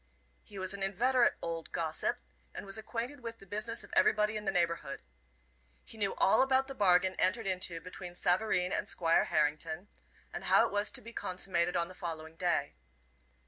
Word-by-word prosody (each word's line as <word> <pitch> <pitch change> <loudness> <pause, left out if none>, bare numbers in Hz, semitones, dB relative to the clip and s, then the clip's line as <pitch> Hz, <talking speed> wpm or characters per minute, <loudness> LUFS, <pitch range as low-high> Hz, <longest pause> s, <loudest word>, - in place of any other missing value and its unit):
He 205 - -12
was 190 0 -2
an 200 - -7
inveterate 235 +6 +3
old 165 -1 -4
gossip, 160 -1 -1 0.4
and - - -6
was 195 - -1
acquainted 240 +5 -5
with 230 -2 -7
the 195 - -15
business 215 +4 -3
of - - -15
everybody 210 0 +3
in 210 0 -4
the 195 - +1
neighborhood. 170 - -1 0.8
He - - -8
knew 205 -3 -1
all - - +4
about 265 0 +3
the 270 - -7
bargain 190 -4 +4
entered 195 +5 +2
into 185 -3 -1
between 180 0 -8
Savareen 180 0 +1
and - - -1
Squire 165 -1 +3
Harrington, 160 +5 -1 0.4
and - - -5
how - - +5
it - - -3
was 205 +1 0
to - - -5
be 230 +1 -11
consummated 180 -3 0
on 170 0 0
the 185 - -11
following 160 -3 -6
day. 170 -5 0
190 Hz, 185 wpm, -32 LUFS, 170-215 Hz, 0.8 s, how